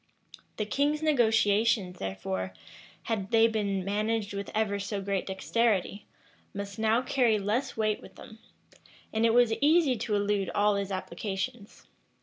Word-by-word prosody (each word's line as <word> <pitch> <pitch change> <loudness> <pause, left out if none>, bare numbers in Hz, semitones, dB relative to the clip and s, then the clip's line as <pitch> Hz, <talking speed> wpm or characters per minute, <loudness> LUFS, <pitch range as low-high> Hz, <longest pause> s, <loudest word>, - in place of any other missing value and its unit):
The 215 - -1
king's 290 +7 0
negotiations, 220 -7 +2
therefore, 95 -1 -4 0.5
had 205 -4 -2
they 225 -1 +5
been 200 -4 -1
managed 210 +1 -1
with 200 0 -5
ever 205 -2 0
so 200 +1 -3
great 195 0 -2
dexterity, 200 0 0 0.5
must 200 +1 -6
now 225 +3 +2
carry 245 -5 +2
less 210 +7 -2
weight 215 -1 0
with - - -14
them; 220 - -13 0.7
and 225 +1 +3
it 225 - +2
was 240 -2 +5
easy 300 -2 +4
to 215 -1 -1
elude 205 -1 0
all 205 0 +3
his 200 -1 -2
applications. 195 +4 -5
210 Hz, 140 wpm, -28 LUFS, 200-230 Hz, 0.7 s, they